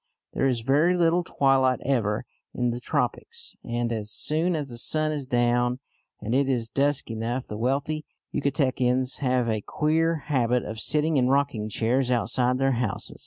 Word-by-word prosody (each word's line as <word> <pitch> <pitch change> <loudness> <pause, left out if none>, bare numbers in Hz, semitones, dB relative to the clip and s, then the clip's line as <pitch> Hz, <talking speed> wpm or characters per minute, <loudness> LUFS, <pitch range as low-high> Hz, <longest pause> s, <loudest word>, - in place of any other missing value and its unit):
There 135 - +1
is 125 -3 0
very 150 +9 +3
little 175 +1 +3
twilight 135 -4 +2
ever 120 -4 0 0.3
in 125 -1 0
the 120 - -4
tropics, 465 - -2
and 120 0 -2
as 110 -2 -3
soon 160 - 0
as 145 -3 -3
the 120 -1 -7
sun 155 +4 +1
is 145 -3 -4
down 120 0 +2 0.4
and 110 - -3
it 135 +1 +2
is 120 -4 -1
dusk 140 -3 +1
enough, 115 +3 -3
the 105 - -7
wealthy 140 +7 -1 0.3
Yucatecans 130 -2 0
have 125 -3 +1
a 110 -2 0
queer 160 +4 0
habit 125 -3 +1
of 110 +1 -5
sitting 150 +4 +1
in 125 -1 +3
rocking 135 -5 +1
chairs 125 +4 0
outside 125 +1 +1
their 135 +1 +2
houses. 105 -6 -3
130 Hz, 165 wpm, -26 LUFS, 120-145 Hz, 0.4 s, very